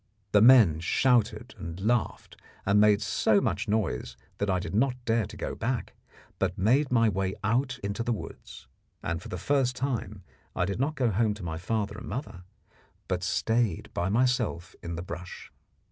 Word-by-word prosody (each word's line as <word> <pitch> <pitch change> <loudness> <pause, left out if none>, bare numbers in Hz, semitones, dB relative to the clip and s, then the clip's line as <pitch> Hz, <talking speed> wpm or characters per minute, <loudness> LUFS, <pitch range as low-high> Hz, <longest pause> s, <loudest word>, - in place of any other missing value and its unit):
The 105 - +5
men 110 -10 +7
shouted 115 +4 +1
and 85 +2 -6
laughed, 115 +4 -1 0.3
and 100 +1 +4
made 105 0 +4
so 105 +1 +3
much 100 -4 -1
noise 90 - -1 0.2
that 100 - 0
I 95 - +2
did 90 - -5
not 125 +4 +2
dare 115 -3 +1
to - - -11
go - - -4
back, 120 +2 -3 0.5
but 90 - 0
made 130 +9 +3
my 115 -2 +4
way 95 -2 -1
out 125 +5 +1
into 100 +2 -2
the 120 +1 -1
woods. 110 - -7 0.4
And 85 0 -2
for - - -10
the 90 - -4
first 130 - +1
time 115 -7 -3 0.3
I 90 - +1
did 100 +3 -3
not 145 +4 0
go 125 -4 +1
home 105 +1 +1
to 105 - -10
my 80 -1 -4
father 105 +2 -2
and - - -9
mother, 110 -5 -5 0.7
but 90 -1 -1
stayed 110 +1 0
by 90 +2 -1
myself 115 -6 0
in 85 0 -5
the 85 - -5
brush. 90 0 -8
105 Hz, 180 wpm, -28 LUFS, 95-120 Hz, 0.7 s, men